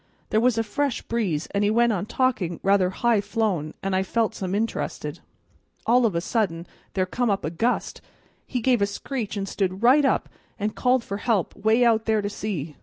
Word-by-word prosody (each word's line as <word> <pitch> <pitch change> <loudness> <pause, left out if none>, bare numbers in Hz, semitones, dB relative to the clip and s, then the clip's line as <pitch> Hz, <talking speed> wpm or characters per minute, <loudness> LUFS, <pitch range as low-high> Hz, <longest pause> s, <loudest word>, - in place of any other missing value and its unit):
There 215 - +4
was 240 0 +3
a 225 - +2
fresh 275 +4 -1
breeze, 185 -10 -1
an' 200 - +1
he 205 - +3
went 235 +1 +3
on 200 +1 -2
talking 210 -11 0
rather 195 -2 +3
high 225 +2 +2
flown, 195 -9 -1
an' 195 0 -1
I 185 - +2
felt 225 +3 0
some 190 0 -3
interested. 225 +2 -3 0.7
All 240 +1 +4
of 200 - -3
a 170 - +1
sudden 175 -5 -1 0.3
there 185 -1 +2
come 240 +5 -1
up 200 -1 0
a 155 - -2
gust, 230 +9 -1
and - - -31 0.4
he 250 - -2
gave 245 -2 +2
a 200 - +3
screech 220 +1 -4
and 195 0 -2
stood 190 +1 -2
right 265 +5 +6
up 270 - +2 0.3
and 210 0 -2
called 250 -1 +2
for 200 - -4
help, 210 -4 0
'way 220 +4 +3
out 225 -2 +3
there 220 -2 +1
to 205 - -2
sea. 165 -9 -4
215 Hz, 210 wpm, -24 LUFS, 190-235 Hz, 0.7 s, right